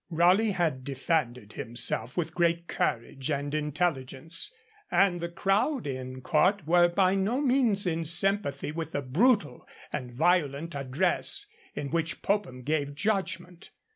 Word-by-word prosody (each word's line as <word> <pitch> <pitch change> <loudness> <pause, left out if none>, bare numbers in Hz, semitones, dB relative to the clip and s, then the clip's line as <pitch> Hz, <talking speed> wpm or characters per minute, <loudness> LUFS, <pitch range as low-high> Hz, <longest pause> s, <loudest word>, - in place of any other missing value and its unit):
Raleigh 180 +6 +4
had 160 -8 0
defended 130 -5 -2
himself 120 +2 -2
with 175 - -1
great 170 0 +1
courage 125 +4 -2
and 145 0 -2
intelligence, 150 - -2 0.4
and 185 -3 +3
the 170 - -3
crowd 195 - +1
in 130 -1 -5
court 175 +7 +2
were 175 +2 +5
by 185 +1 +2
no 200 +6 +1
means 250 -8 +2
in 165 -2 0
sympathy 170 -4 +1
with 165 +1 -5
the 145 - -1
brutal 155 - +2 0.3
and 125 -1 -4
violent 160 +2 +1
address 155 - -1 0.3
in 140 - -4
which 165 0 -2
Popham 195 -12 -1
gave 145 0 -1
judgment. 190 -1 -2
165 Hz, 135 wpm, -28 LUFS, 140-190 Hz, 0.4 s, were